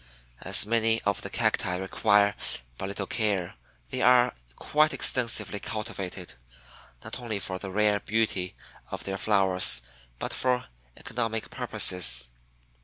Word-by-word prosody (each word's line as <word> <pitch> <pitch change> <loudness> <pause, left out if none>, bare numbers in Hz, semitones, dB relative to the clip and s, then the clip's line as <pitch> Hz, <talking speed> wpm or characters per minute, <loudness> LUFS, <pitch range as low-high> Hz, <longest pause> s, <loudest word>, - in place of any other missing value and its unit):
As 100 +3 +4
many 115 0 +1
of 100 -1 -1
the - - -6
Cacti 90 - 0
require 100 +2 +1 0.4
but 95 - -4
little 100 0 -4
care, 100 -5 -2 0.4
they - - -3
are 125 0 +4 0.2
quite 155 +1 +1
extensively 110 -5 +3
cultivated, 95 -5 -6 0.7
not - - -7
only 115 -4 -4
for 95 -1 -5
the 95 - -7
rare 105 +1 +1
beauty 100 - -2 0.3
of - - -7
their 95 0 -5
flowers, 95 - +4 0.3
but - - -5
for 125 -1 -1 0.3
economic 115 -2 -4
purposes. 65 -9 +3
100 Hz, 125 wpm, -26 LUFS, 95-115 Hz, 0.7 s, As